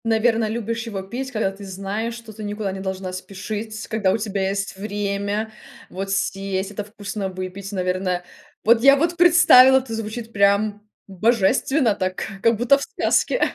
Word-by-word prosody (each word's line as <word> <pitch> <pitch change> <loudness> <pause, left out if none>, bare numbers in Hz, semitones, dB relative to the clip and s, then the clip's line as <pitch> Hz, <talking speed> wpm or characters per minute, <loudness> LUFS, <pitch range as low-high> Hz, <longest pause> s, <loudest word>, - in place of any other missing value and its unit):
Наверно, 225 0 +2
любишь 230 +1 -3
его 195 -4 -4
пить, 255 +7 -5
когда 215 -5 0
ты 195 +1 -12
знаешь, 200 +4 -4
что 230 -2 -11
ты 215 +1 -9
никуда 205 -1 -3
не 190 - -6
должна 190 -1 -4
спешить, 205 +3 -6
когда 215 -4 +1
у - - +1
тебя 200 -3 -2
есть 195 0 -3
время 205 +1 -3 0.4
вот 195 +1 -5
съесть 195 0 -2
это 210 0 -4
вкусно, 205 -1 -5
выпить, 185 +2 -7
наверное. 185 -1 -1 0.4
Вот 230 +1 +5
я 275 +2 +7
вот 330 +4 0
представила, 315 -7 +7
это 255 -3 -3
звучит 225 +1 -5
прям 205 +1 +2 0.3
божественно 230 - +2
так, 185 -2 -3 0.2
как 230 0 +3
будто 245 +5 +4
в - - -9
сказке. - - +1
205 Hz, 165 wpm, -22 LUFS, 195-230 Hz, 0.4 s, я